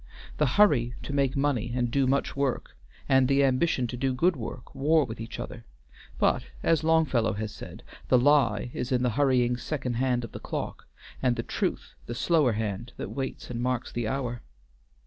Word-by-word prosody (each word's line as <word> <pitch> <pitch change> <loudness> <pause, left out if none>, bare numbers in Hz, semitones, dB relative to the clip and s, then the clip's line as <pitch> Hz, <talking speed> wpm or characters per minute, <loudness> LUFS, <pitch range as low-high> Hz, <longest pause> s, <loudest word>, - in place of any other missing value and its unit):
The 150 - +4
hurry 130 - +4
to 140 - -5
make 140 -2 +1
money 125 -5 0
and 120 -2 0
do 135 +1 +2
much 135 +2 0
work, 140 -2 -2 0.3
and 130 -1 +4
the 140 +1 +3
ambition 130 0 +2
to 120 - -4
do 130 +1 -1
good 170 +6 +3
work, 115 -5 -7
war 155 +2 +3
with 115 -1 -7
each 115 - -7
other, - - -7 0.5
but, - - +2 0.2
as 165 -2 +2
Longfellow 155 -8 +2
has 105 +1 -4
said, - - -10 0.2
the 125 - +5
lie 120 -5 +3
is 125 - -3
the 125 -1 +2
hurrying 125 -2 +2
second 125 -2 -3
hand 125 -1 +1
of 115 - -7
the - - -7
clock, - - -5 0.3
and 125 -2 +2
the - - -3
truth - - -3
the 120 - -4
slower 140 -1 +3
hand 110 +2 -3
that - - -5
waits 135 -2 -5
and 120 -1 -3
marks 125 0 -1
the 120 -2 -2
hour. 120 -1 -3
130 Hz, 185 wpm, -27 LUFS, 120-140 Hz, 0.5 s, the